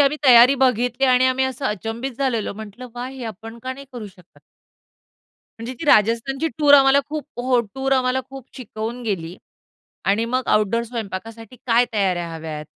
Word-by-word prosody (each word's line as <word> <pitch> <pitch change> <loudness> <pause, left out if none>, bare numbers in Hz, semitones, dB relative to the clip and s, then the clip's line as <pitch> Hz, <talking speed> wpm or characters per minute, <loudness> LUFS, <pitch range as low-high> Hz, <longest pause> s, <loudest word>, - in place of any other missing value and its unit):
आम्ही 285 +1 +3
तयारी 250 +1 +8
बघितली 250 +1 +1
आणि 255 0 +4
आम्ही 260 +1 +1
असं 260 +1 -3
अचंबित 225 +6 -4
झालेलो. 245 -7 -1
म्हंटल 220 +3 -9
वा! 245 +1 -5
हे 260 -2 -8
आपण 225 +2 -8
का 260 - -4
नाही 275 +1 -11
करू 230 -4 -7
शकत? 185 -2 -19 1.2
म्हणजे 235 +3 -5
ती - - -4
राजस्थानची 245 +6 +2
टूअर 290 -1 +6
आम्हाला 275 0 +6
खूप 305 -1 -4 0.2
हो, 250 -1 +2
टूअर 270 0 -1
आम्हाला 260 0 +1
खूप 270 -2 -10
शिकवून 235 0 -6
गेली 180 -5 -4 0.7
आणि 215 +3 +2
मग 255 +2 -2
आउटडोर 215 +2 +2
स्वयंपाकासाठी 225 0 -7
काय 240 +1 +4
तयाऱ्या 185 -5 0
हव्यात, 155 -2 -6
240 Hz, 165 wpm, -21 LUFS, 220-260 Hz, 1.2 s, तयारी